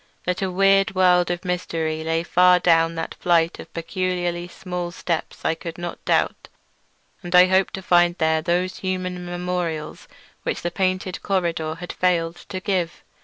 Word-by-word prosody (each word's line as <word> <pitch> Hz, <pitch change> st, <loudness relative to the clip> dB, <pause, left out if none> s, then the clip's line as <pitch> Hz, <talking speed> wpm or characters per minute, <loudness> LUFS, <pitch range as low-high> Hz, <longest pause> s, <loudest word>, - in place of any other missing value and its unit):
That 180 Hz, +1 st, -1 dB
a 190 Hz, -, 0 dB
weird 195 Hz, +1 st, +3 dB
world 180 Hz, -1 st, +4 dB
of 175 Hz, +1 st, -3 dB
mystery 165 Hz, -3 st, -2 dB
lay 165 Hz, +1 st, 0 dB
far 180 Hz, +1 st, +5 dB
down 165 Hz, -1 st, +3 dB
that 165 Hz, -, -4 dB
flight 170 Hz, -1 st, +1 dB
of -, -, -10 dB
peculiarly 175 Hz, 0 st, -2 dB
small 180 Hz, -1 st, -5 dB
steps 170 Hz, -1 st, -4 dB
I -, -, +3 dB
could 165 Hz, 0 st, -7 dB
not 175 Hz, 0 st, -6 dB
doubt, -, -, +1 dB, 0.7 s
and 175 Hz, -1 st, -2 dB
I 180 Hz, 0 st, +9 dB
hoped 190 Hz, +1 st, +2 dB
to 190 Hz, -, -8 dB
find 175 Hz, 0 st, +4 dB
there 160 Hz, -1 st, +2 dB
those 180 Hz, +3 st, 0 dB
human 185 Hz, -1 st, -3 dB
memorials 175 Hz, -3 st, -4 dB, 0.3 s
which -, -, -3 dB
the 175 Hz, -, -1 dB
painted 185 Hz, 0 st, -1 dB
corridor 170 Hz, -5 st, -1 dB
had 175 Hz, +1 st, -7 dB
failed 170 Hz, -2 st, 0 dB
to 185 Hz, -, -4 dB
give. 185 Hz, -3 st, -2 dB
175 Hz, 165 wpm, -23 LUFS, 170-185 Hz, 0.7 s, I